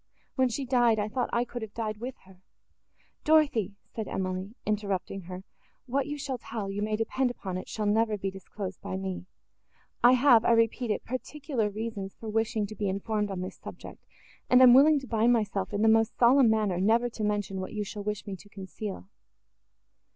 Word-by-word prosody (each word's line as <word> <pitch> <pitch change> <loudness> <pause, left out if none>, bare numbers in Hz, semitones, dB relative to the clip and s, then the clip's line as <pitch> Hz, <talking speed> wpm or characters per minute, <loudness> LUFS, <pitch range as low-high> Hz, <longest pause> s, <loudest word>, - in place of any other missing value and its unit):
When 260 -2 +2
she 270 +3 -3
died, 240 -3 +3
I 210 0 0
thought 250 +2 -1
I 235 +1 +1
could 240 0 -7
have 215 -2 -8
died 215 -2 -3
with 245 +4 -6
her!" 185 -1 -18 0.8
"Dorothée," 285 - +3 0.2
said 220 -2 -4
Emily, 185 +3 -3
interrupting 200 -2 -2
her, 185 +1 -7 0.4
"what 270 +3 -1
you 295 0 -4
shall 270 -3 -4
tell, 210 -4 -5
you 200 +1 -3
may 215 0 0
depend 245 +4 0
upon 190 -6 -5
it, 185 - -6
shall 215 - -3
never 215 +1 +2
be 195 -1 -3
disclosed 190 0 -7
by 190 - -4
me. 190 -1 -5 0.8
I 245 +1 +8
have, 245 -3 +6
I 235 - +4
repeat 230 +1 +2
it, 210 - -1
particular 255 -2 -3
reasons 205 -2 -5
for 225 - -8
wishing 220 -1 0
to 215 +2 -8
be 205 -2 -1
informed 210 +2 -1
on 190 -2 -4
this 185 - -6
subject, - - -10 0.5
and 250 - +7
am 245 -1 +9
willing 295 +4 +7
to 265 - -10
bind 230 +1 +3
myself, 205 -4 -1
in 205 +1 0
the - - +5
most 225 0 +3
solemn 245 0 +6
manner, 210 -5 +1
never 230 +4 +3
to 220 -2 -6
mention 205 -2 -1
what 185 - -6
you 210 -1 -2
shall 205 0 -6
wish 210 -1 -3
me 200 -2 -5
to 205 - -17
conceal." 195 0 -7
215 Hz, 200 wpm, -28 LUFS, 200-240 Hz, 0.8 s, am